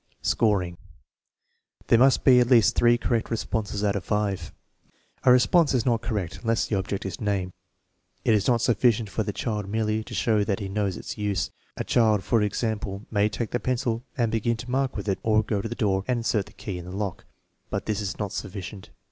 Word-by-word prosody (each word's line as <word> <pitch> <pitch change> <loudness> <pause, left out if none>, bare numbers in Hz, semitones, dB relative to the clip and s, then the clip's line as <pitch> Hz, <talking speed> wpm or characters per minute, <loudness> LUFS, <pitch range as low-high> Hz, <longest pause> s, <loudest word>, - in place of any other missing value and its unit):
Scoring. 90 -6 +1 1.1
There 115 - +4
must 135 +1 +4
be 125 -2 +7
at 120 -1 +2
least 115 -3 +5
three 120 0 +4
correct 120 -1 -1
responses 110 -2 -2
out 100 -1 +1
of 100 - -2
five. 105 -2 -1 0.7
A 125 - +7
response 140 +5 +4
is 120 - +1
not 115 -3 +2
correct 105 -8 -3
unless 115 -1 +1
the 110 - -1
object 95 0 -3
is 95 -3 -5
named. 100 -3 -1 0.7
It 115 - +4
is 105 -2 +2
not 120 -2 +3
sufficient 115 -3 +2
for - - -1
the 105 - -2
child 105 -2 -3
merely 110 0 0
to - - -7
show 110 -3 +2
that 100 0 -1
he 100 -2 -4
knows 100 -2 -1
its - - -7
use. 105 -2 -1 0.3
A - - -2
child, 110 -4 +3
for 115 +4 +2
example, 105 -1 -2
may 105 -1 +2
take 110 0 -4
the 120 - 0
pencil 120 -2 -1 0.2
and 115 -3 +1
begin 115 +1 0
to 120 +3 -7
mark 135 0 0
with - - -5
it, 95 - 0
or 110 -1 +3
go 105 -1 -1
to - - -4
the - - -4
door 95 -5 +1
and 125 -2 0
insert 105 -3 0
the - - -16
key 95 -3 -6
in 85 - -8
the 90 - -8
lock; 100 -4 -4 0.4
but - - -3
this 110 -1 -1
is 95 -3 -4
not 105 -2 -3
sufficient. 100 -1 -6
110 Hz, 215 wpm, -26 LUFS, 100-115 Hz, 1.1 s, be